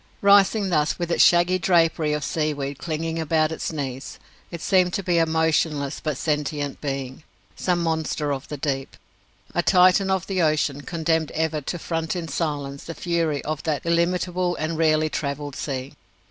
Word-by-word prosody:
Rising 200 0 +5
thus, 150 -1 +1
with 175 -1 -3
its - - +5
shaggy 175 +1 +4
drapery 165 -4 +2
of 150 -1 -2
seaweed 145 -3 -2
clinging 165 0 -3
about 155 0 +1
its 160 - -3
knees, 135 -4 -5 0.3
it 170 - -7
seemed 180 0 +2
to 200 - -1
be 175 -2 +2
a 165 - +3
motionless 160 -3 0
but 150 -4 -2
sentient 150 -2 -2
being 135 -2 -4 0.3
some 175 -2 0
monster 160 -2 -1
of 135 -1 -6
the 150 - -6
deep, 135 -1 -3 0.6
a 175 - +2
Titan 185 +2 +4
of 190 -1 0
the 190 -2 -1
ocean 150 -3 +1
condemned 160 0 -1
ever 160 -1 0
to 175 - -4
front 165 0 -3
in 170 -2 -4
silence 145 -3 -3
the 165 - -6
fury 165 -4 -1
of 155 -2 -3
that 155 -2 -2
illimitable 175 +1 +1
and 155 +1 -3
rarely 155 -1 +3
travelled 145 -2 -4
sea. 135 -2 -4
160 Hz, 170 wpm, -23 LUFS, 145-175 Hz, 0.6 s, Rising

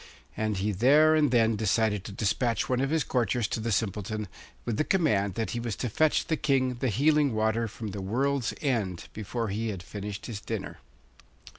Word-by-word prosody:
And 110 -2 -1
he 100 +3 0
there 145 +10 +5
and 155 -2 +3
then 115 -2 +3
decided 105 -1 +1
to - - -6
despatch 110 +2 0
one 125 0 +1
of 135 - 0
his 160 0 +1
courtiers 120 -2 0
to - - -2
the 115 +1 -2
Simpleton, 105 +1 -2 0.4
with 115 -3 -2
the - - +2
command 105 - +1
that 115 -1 -2
he 120 - -2
was 115 -3 -3
to 125 - -3
fetch 155 +8 +2
the 160 - 0
King 130 -3 +1
the 130 - 0
healing 145 +3 +3
water 110 +1 +1
from 110 +1 -7
the 100 0 -5
world's 130 +6 0
end 110 - -1
before 110 +1 -3
he 110 +4 -2
had 95 -5 -4
finished 100 +1 -6
his 105 -4 -6
dinner. - - -5
115 Hz, 195 wpm, -28 LUFS, 105-130 Hz, 0.4 s, there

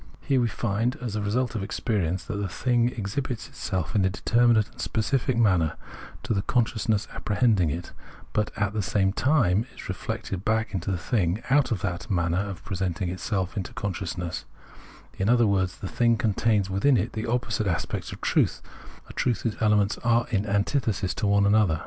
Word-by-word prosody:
Here 135 -3 +2
we 120 - +2
find, 115 +2 -1
as 120 -4 -4
a 105 - -1
result 120 +5 0
of 110 - -2
experience, 95 -4 -1
that 105 +2 -4
the 100 -1 -2
thing 120 +4 +1
exhibits 120 +2 -4
itself, 90 -3 -3
in 100 - +3
a 95 - +3
determinate 115 +2 +3
and - - -9
specific 125 +2 0
manner, 90 -9 +3 0.5
to - - 0
the 100 - +1
consciousness 110 -2 0
apprehending 105 -6 +2
it, 85 +4 -4 0.4
but 105 -1 +1
at 105 -1 0
the 110 - 0
same 95 +1 +1
time 120 - +2
is - - -9
reflected 95 -1 -4
back 110 +1 0
into 95 0 -2
itself 90 +5 -5 0.4
out 140 -2 +4
of 105 -5 -1
that 90 -3 -3
manner 85 -2 +1
of 100 -4 -4
presenting 90 -2 -2
itself 95 0 -2
to 100 +3 -4
consciousness; 90 -5 -4 0.7
in 95 +2 +1
other 120 -1 +5
words, 95 -3 +1
the 95 - -5
thing 115 +3 +2
contains 105 -1 +1
within 100 +8 +3
it 110 +2 -1
opposite 115 -3 0
aspects 85 -2 -2
of - - -9
truth, - - +2 0.5
a - - -11
truth 120 -5 0
whose 115 -2 -1
elements 105 -1 +3
are 120 0 +2
in 105 -1 0
antithesis 100 -1 0
to 105 - -1
one 100 0 +4
another. 100 -6 +3
105 Hz, 180 wpm, -26 LUFS, 95-115 Hz, 0.7 s, other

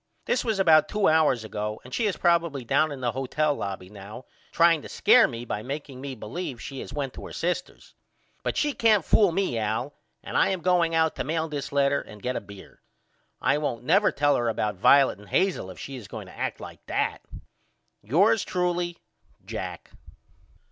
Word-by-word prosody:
This 250 - +1
was 220 -4 -1
about 160 -5 +5
two 210 -1 +1
hours 155 -7 +3
ago 105 0 -4
and 125 - -12
she 225 - +1
is 200 - -2
probily 170 -6 +1
down 155 +6 +2
in 140 -2 -7
the 120 -1 0
hotel 135 +4 0
lobby 100 -6 -5
now 105 +5 -11 0.3
trying 165 -2 +4
to - - -10
scare 230 +3 +5
me 120 -2 -7
by 105 - -3
makeing 135 +1 -6
me 135 -1 -5
believe 130 +4 -6
she 135 +2 -7
has - - -7
went 140 -3 -4
to - - -9
her - - -11
sister's. 180 +1 -4 0.5
But - - -2
she 295 -1 +1
can't 215 - +3
fool 205 -5 +4
me 175 -10 0
Al 110 +6 -2 0.3
and - - -7
I - - +4
am 190 -2 -2
now - - -21
going 175 -2 +2
out 160 -1 +2
to - - -1
mail 160 +1 -1
this 145 -3 -5
letter 140 0 +2
and 105 - -13
get 125 +4 -3
a - - -2
beer. 100 -1 -14 0.6
I 150 - +2
won't 125 -6 -3
never 195 - +4
tell 145 0 +2
her 120 -1 0
about 105 -1 -1
Violet 130 +3 +4
and 105 -2 -15
Hazel 185 - +1
if 95 - -10
she 135 -1 -7
is 115 -7 -10
going - - -8
to - - -14
act - - -3
like - - -10
that. - - -1 0.8
Yours 180 - +3
truly, 175 -1 -1 0.5
JACK. - - -6
145 Hz, 205 wpm, -26 LUFS, 120-175 Hz, 0.8 s, about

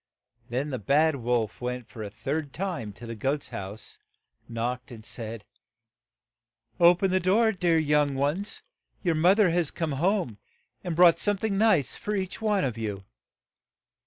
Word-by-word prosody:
Then 135 +5 -2
the 130 - -3
bad 145 - +3
wolf 120 -3 -1
went 125 -1 -5
a 110 -3 -5
third 140 +6 -4
time 170 - -3
to 120 - -11
the 115 - -5
goat's 135 +6 -2
house, 100 +2 -8 0.5
knocked, 120 +2 -3
and 110 -3 -11
said, 115 -2 -6 1.3
"O 175 0 +7
pen 190 +1 0
the 185 - +3
door, 210 +5 +3
dear 175 -4 +2
young 150 -2 +2
ones; 150 +10 -1 0.4
your 175 -3 +2
moth 175 +5 +4
er 185 -5 +4
has 170 -3 +1
come 165 -3 -3
home, 160 - 0 0.4
and 175 - -2
has - - -4
brought 170 -1 +6
some 205 -1 +1
thing 205 0 -1
nice 195 - +3
for 210 - -3
each 190 +1 -3
one 210 -3 +2
of 120 -4 -2
you." 100 -3 -4
150 Hz, 165 wpm, -27 LUFS, 120-180 Hz, 1.3 s, O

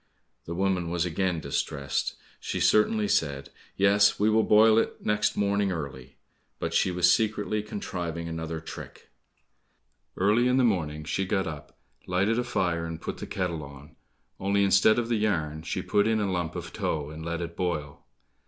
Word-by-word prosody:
The 85 - -5
woman 95 -2 0
was 85 0 0
again 90 0 -1
distressed; 70 -1 -2 0.2
She - - -3
certainly 105 0 +3
said, 70 -6 0 0.3
"Yes, 100 +1 +4
we 105 +1 +3
will 110 +1 +4
boil 110 +1 +6
it - - -3
next 105 0 +1
morning 100 -1 +1
early." 70 -5 -6 0.4
but - - -3
she - - +3
was 90 0 +4
secretly 110 -1 0
contriving 85 -5 -5
another 80 -1 -4
trick. 80 - -10 1.1
Early 105 +6 +3
in 125 +1 +3
the 130 - +4
morning 80 -9 0
she 95 +5 -1
got 95 0 0
up, 75 -3 -8 0.3
lighted 100 +6 +1
a - - 0
fire, 85 -8 -1
and 80 -1 -6
put - - -6
the - - -6
kettle 90 -4 -2
on, 70 +2 -12 0.4
only 100 +1 +2
instead 100 +3 +5
of 120 -1 0
the 115 -1 +1
yarn, 80 -8 -1
she 80 - -3
put 105 +1 +2
in 110 -1 +2
a 100 -2 0
lump 85 -3 -2
of - - -6
tow, 75 -1 -2
and 80 +1 -8
let 85 0 -3
it 85 -1 -5
boil. 80 -6 -3
90 Hz, 175 wpm, -27 LUFS, 80-105 Hz, 1.1 s, boil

